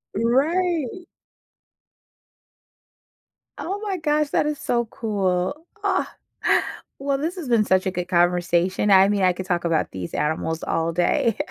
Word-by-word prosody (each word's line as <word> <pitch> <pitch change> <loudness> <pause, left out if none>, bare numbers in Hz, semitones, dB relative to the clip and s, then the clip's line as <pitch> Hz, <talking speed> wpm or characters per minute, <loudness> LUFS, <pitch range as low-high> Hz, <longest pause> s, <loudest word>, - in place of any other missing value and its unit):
Right. 325 +6 0 2.5
Oh 390 +4 -4
my 390 -3 -2
gosh, 300 -2 +1
that - - +1
is 300 -2 -2
so 235 -1 0
cool. 205 - -2 0.2
Ah, 400 - 0 0.8
well, 275 0 0
this 325 +6 -3
has 320 -9 -6
been 220 -3 +3
such 185 0 +2
a 190 - 0
good 180 -1 -4
conversation. 175 +2 +2
I 190 0 +7
mean, 200 -2 +1
I 180 -1 +4
could 185 +1 -6
talk 175 -2 -1
about 165 -2 0
these 90 -2 -6
animals 160 +1 -2
all 165 0 -1
day, 180 +5 +1
205 Hz, 140 wpm, -23 LUFS, 180-295 Hz, 2.5 s, I